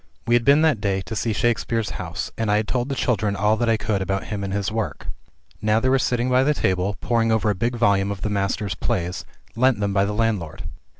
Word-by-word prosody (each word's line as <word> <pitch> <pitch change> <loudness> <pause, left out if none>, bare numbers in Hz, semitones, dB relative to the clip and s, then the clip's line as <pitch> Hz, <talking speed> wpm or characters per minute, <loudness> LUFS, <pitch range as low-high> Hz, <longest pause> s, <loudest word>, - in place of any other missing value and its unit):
We 120 - +1
had 120 0 +4
been 140 +5 +5
that 150 -10 +2
day 95 -2 0
to 110 +4 -6
see 115 +2 -1
Shakespeare's 115 0 0
house, 85 0 -5
and 115 -1 -2
I 105 - +3
had 105 0 -1
told 125 +1 -1
the 135 - -2
children 105 -6 0
all 105 +2 +2
that 120 0 0
I 115 - +3
could 105 -2 -1
about 95 +1 -1
him 105 -2 -5
and 100 - -3
his 100 0 -1
work. 110 -1 -3 0.6
Now 110 +1 +2
they 130 - +1
were 135 0 +3
sitting 125 -1 0
by 130 0 +3
the 150 +2 +2
table, 95 -1 0
poring 115 -1 +1
over 110 -1 +2
a - - +1
big 120 +5 -1
volume 100 -4 +2
of 100 -2 -5
the 105 - -1
Master's 100 -1 -1
plays, 90 0 -2 0.3
lent 125 -1 +3
them 100 -1 -1
by 100 0 +3
the 105 - -2
landlord. 100 -8 -1
105 Hz, 245 wpm, -23 LUFS, 100-120 Hz, 0.6 s, been